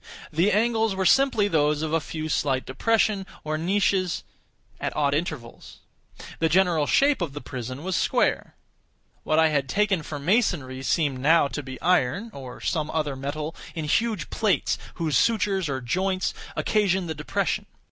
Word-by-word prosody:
The 175 +7 +3
angles 225 0 +2
were 190 0 -1
simply 265 -3 +4
those 150 -4 +1
of 160 0 -2
a 165 - +3
few 155 0 -5
slight 135 -4 0
depressions, 205 - +1 0.2
or 155 0 -2
niches, 185 +2 +1 0.6
at - - -3
odd 140 -2 +1
intervals. 145 -6 -5 0.6
The 165 - +2
general 170 -4 +3
shape 280 -5 +3
of 160 -5 -2
the 145 - -5
prison 130 +1 -6
was 185 0 -1
square. - - +1 0.7
What 155 - 0
I 160 0 +5
had 140 -3 0
taken 200 -4 +1
for 150 0 -6
masonry 145 - 0
seemed 140 -1 0
now 150 +2 +4
to 140 - -4
be 130 -2 -8
iron, 180 - +1
or 130 -2 -9
some 155 -3 -1
other 150 -4 -1
metal, 150 +4 -4 0.2
in 160 -2 -3
huge 215 +2 0
plates, 215 -4 +1 0.2
whose 160 -5 -1
sutures 195 -6 +1
or 135 -1 -2
joints 185 +9 -1 0.2
occasioned 190 -4 +1
the 160 - -2
depression. - - -2
160 Hz, 160 wpm, -25 LUFS, 145-195 Hz, 0.7 s, I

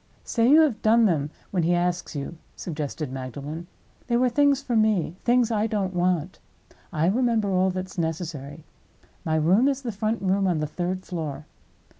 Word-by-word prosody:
"Say 230 0 +2
you 305 +3 +8
have 285 -8 +1
done 225 +1 +5
them 155 -7 +1 0.2
when 185 - +1
he 170 +2 +2
asks 175 -1 -1
you," 145 +3 -5 0.2
suggested 150 -3 -4
Magdalen. 140 +6 -6 0.4
"They 235 -1 +2
were 250 +1 +3
things 285 +2 +3
for 260 -4 -3
me—things 220 +3 +2
I 215 0 +1
don't 200 -4 -1
want. 180 -1 0 0.5
I 155 0 0
remember 225 0 +2
all 185 0 +3
that 185 0 -3
is 185 - -9
necessary. 160 -3 -4 0.6
My 160 -1 0
room 180 - +4
is 275 -1 -1
the 240 - -2
front 215 +2 -1
room 195 +1 +2
on 175 -3 +1
the 150 - 0
third 180 +4 -3
floor. 155 -4 -5
185 Hz, 175 wpm, -25 LUFS, 160-225 Hz, 0.6 s, you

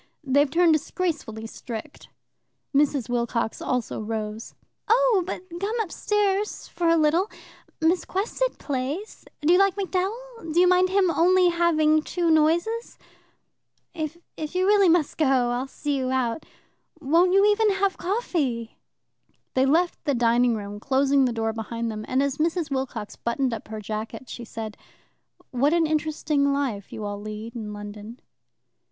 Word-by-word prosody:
"They've 285 +1 +3
turned 335 +2 +4
disgracefully 310 - -2
strict. 230 +5 -8 0.7
Mrs. 280 -3 +2
Wilcox 235 -2 -1
also 250 -3 -2
rose. 215 0 -5 0.3
"Oh, 475 -3 +4
but 370 - -4 0.2
come 430 +5 -2
upstairs 415 0 -1
for 345 - -2
a 335 - +4
little. 325 +6 +2 0.5
Miss 335 +3 +2
Quested 465 +6 -2
plays. 285 +9 -4 0.2
Do 310 +4 +4
you 360 - +5
like 390 -1 +4
MacDowell? 400 +1 -3
Do 335 - +2
you 360 - +6
mind 365 +1 +4
him 380 -2 +3
only 360 +2 +4
having 310 -3 +3
two 340 +1 0
noises? 340 +9 +1 1.0
If 315 -2 -4 0.2
you 340 +4 -1 0.2
must 325 -3 +2
really 295 - +4
go, 250 -3 +2
I'll 250 +2 -2
see 285 0 -2
you 255 -1 -1
out. 255 +1 -1 0.5
Won't 335 +5 +3
you 395 +1 +5
even 430 +1 +3
have 390 0 +1
coffee?" 310 - -2 0.7
They 260 +1 +3
left 345 +5 +1
the 285 - +1
dining 240 0 +3
room, 205 -1 -6
closing 275 +2 +3
the 250 - +1
door 225 -1 -1
behind 230 +1 -4
them, 215 0 -6
and 260 +2 +1
as 280 0 -1
Mrs. 325 -1 0
Wilcox 255 -6 -4
buttoned 245 +1 -1
up 225 - -6
her 215 0 -6
jacket, 215 +4 -6
she 235 - -7
said: 220 -1 -7 0.7
"What 275 +5 +2
an 335 -1 +3
interesting 305 -2 0
life 260 -8 -2
you 215 - -6
all 205 0 -5
lead 215 +2 -7
in 215 -3 -5
London!" 210 +3 -8
290 Hz, 150 wpm, -25 LUFS, 235-355 Hz, 1.0 s, you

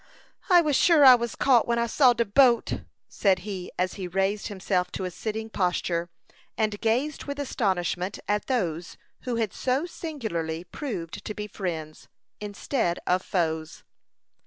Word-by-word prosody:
"I 355 -2 +7
was 300 -4 +1
sure 315 -2 +6
I 260 - +11
was 235 -2 0
caught, 250 -4 +4
when 235 0 +1
I 235 - +2
saw 250 +1 +4
de 235 0 0
boat," 240 +2 +3 0.3
said 190 -3 +2
he, 190 -4 -5
as 180 0 0
he 185 - -3
raised 195 +3 -1
himself 190 -2 -1
to 190 - -3
a 180 - -4
sitting 220 +4 -4
posture, 175 -4 -1 0.5
and 215 -2 -1
gazed 250 +7 0
with 285 0 -5
astonishment 190 -8 -1
at 210 0 0
those 175 - -2 0.3
who 250 -2 -1
had 225 -4 -1
so 260 +5 0
singularly 210 - -4
proved 180 - -6
to 210 - -5
be 210 - -4
friends, 165 -7 -5 0.3
instead 205 -2 -2
of 180 +1 +2
foes. 160 -4 -2
210 Hz, 160 wpm, -26 LUFS, 180-245 Hz, 0.5 s, I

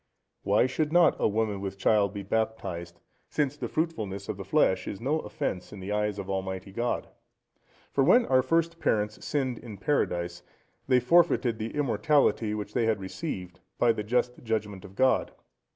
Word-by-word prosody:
Why 105 +4 +3
should 150 +4 -1
not 175 -1 +5
a - - +3
woman 105 -2 -1
with 95 0 -5
child 100 0 +3
be 100 -1 -6
baptized, 95 -5 -3 0.3
since 145 -2 0
the - - -4
fruitfulness 110 - -3
of - - -3
the - - -6
flesh 95 -1 +2
is 100 - -5
no 145 +7 0
offence 140 - -4
in 105 - -9
the 95 +2 -5
eyes 105 -1 0
of 100 -2 -5
Almighty 95 0 -4
God? 120 +4 -2 0.8
For 135 - +2
when 235 - +5
our 130 -1 +4
first 165 +4 0
parents 105 0 0
sinned 130 -5 -1
in 110 -4 -9
Paradise, 90 - -1 0.5
they 130 -1 +5
forfeited 125 -4 +3
the 110 +4 -4
immortality 130 -4 +2
which 105 0 -5
they 120 -2 +1
had 110 -2 +1
received, 95 - -6 0.2
by 120 - +4
the 110 - -2
just 125 +3 0
judgement 105 -4 -2
of 95 -1 -13
God. 130 +2 +2
110 Hz, 175 wpm, -28 LUFS, 100-135 Hz, 0.8 s, not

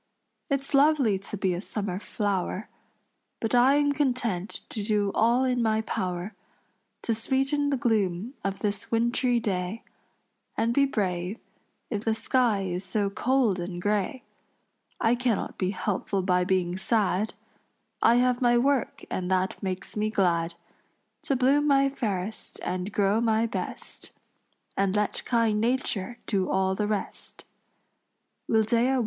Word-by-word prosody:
It's 275 0 -2
lovely 275 -8 +4
to 200 +2 -6
be 190 -2 +1
a 175 - -3
summer 200 -3 -4
flower, 200 -1 -2 0.7
But 225 - -2
I 250 +3 +6
am 290 0 +3
content 245 -9 -1
to 215 - -4
do 205 -1 +1
all 235 +3 +3
in 250 -2 +1
my 220 -1 +2
power 185 -1 -3 0.7
To 230 - +1
sweeten 270 +5 0
the 275 - +1
gloom 215 -2 0
of 195 0 -3
this 205 -2 -2
wintry 235 +1 +2
day, 195 0 -2 0.7
And 230 +1 +1
be 275 +2 +4
brave 185 -4 -2 0.5
if 210 -2 -2
the 225 -1 +1
sky 230 -5 +1
is 180 0 -3
so 200 +1 -1
cold 245 -4 +1
and 175 0 -4
gray. 205 +6 -1 0.8
I 225 0 +3
cannot 245 -3 -1
be 185 - +1
helpful 195 -1 -1
by 180 -1 +2
being 180 -1 0
sad; 210 -1 +1 0.7
I 235 - +6
have 250 0 +2
my 240 -1 +4
work 270 0 +1
and 180 -1 -2
that 190 +3 0
makes 190 -1 -4
me 215 0 0
glad 170 -5 +1 0.7
To 275 - +1
bloom 275 +4 +3
my 275 -1 +4
fairest 215 -6 -3
and 185 +2 -3
grow 200 +2 +2
my 225 -1 +2
best, 230 - -6 0.7
And 195 0 +1
let 210 0 0
kind 225 -3 +2
nature 240 -2 -1
do 195 -4 0
all 190 0 +2
the 205 +2 -1
rest." 210 -2 -4 1.1
Wildea 230 +4 +3
Wood. - - +2
215 Hz, 145 wpm, -27 LUFS, 190-245 Hz, 1.1 s, I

